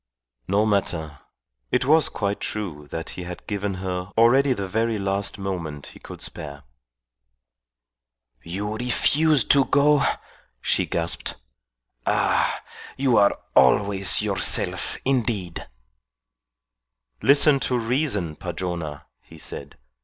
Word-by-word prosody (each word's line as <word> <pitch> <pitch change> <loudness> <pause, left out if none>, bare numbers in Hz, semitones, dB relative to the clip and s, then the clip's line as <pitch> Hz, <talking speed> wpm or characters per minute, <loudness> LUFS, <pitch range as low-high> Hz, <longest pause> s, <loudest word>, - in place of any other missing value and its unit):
No 100 +3 +2
matter. 80 -8 -2 0.5
It - - +1
was 155 +3 +4
quite 100 -1 -3
true 85 -9 -5
that 80 +2 -6
he - - -8
had 90 0 -8
given 100 -1 -3
her 90 0 -4
already 130 +5 +4
the 100 -5 -4
very 110 +3 -1
last 100 0 -1
moment 85 -7 -5
he - - -15
could - - -11
spare. 70 -1 -7 1.8
"You 105 - -5
refuse 140 +4 +2
to 140 -1 +4
go?" 145 0 +3 0.6
she - - 0
gasped. 85 -1 -2 0.7
"Ah! - - +1 0.3
you 130 -3 +2
are 100 0 +4 0.2
always 100 -1 +5
yourself, 100 -3 0
indeed." 110 -9 -2 1.5
"Listen 140 +1 +5
to 125 -1 0
reason, 115 - 0
Padrona," 85 -4 -5 0.2
he 80 - -16
said. - - -8
100 Hz, 110 wpm, -23 LUFS, 90-125 Hz, 1.8 s, always